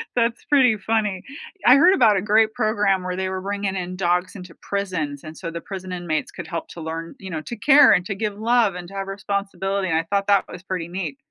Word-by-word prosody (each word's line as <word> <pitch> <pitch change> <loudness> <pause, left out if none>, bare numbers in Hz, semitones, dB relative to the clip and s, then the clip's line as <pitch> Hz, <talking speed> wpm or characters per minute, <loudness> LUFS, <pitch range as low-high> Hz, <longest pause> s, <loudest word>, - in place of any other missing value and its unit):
That's 235 -1 0
pretty 255 -6 +4
funny. 210 -3 -1 0.4
I 250 - +8
heard 345 +7 +6
about 225 - +4
a - - 0
great 215 +1 +3
program 210 -5 +1
where 180 0 -3
they 190 0 -2
were 190 0 -4
bringing 200 0 -3
in 185 -1 -4
dogs 180 0 0
into 180 -3 -10
prisons, 180 -8 -3
and 155 0 -10
so 165 -3 -6
the 170 0 -6
prison 185 -1 -7
inmates 175 -3 -3
could 175 -3 -8
help 165 0 -5
to 170 - -9
learn, 165 +1 -6
you 190 - -8
know, 160 -3 -4
to 235 - -7
care 290 -1 +7
and 180 - +3
to 200 - -3
give 210 0 -3
love 225 -3 +2
and 180 -1 -7
to - - -13
have 195 0 -4
responsibility, 195 -1 -2
and 160 - +2
I 165 - -1
thought 200 -1 0
that 200 -1 +4
was 180 - -10
pretty 185 -3 -4
neat. 170 -6 -5
195 Hz, 240 wpm, -22 LUFS, 180-210 Hz, 0.4 s, I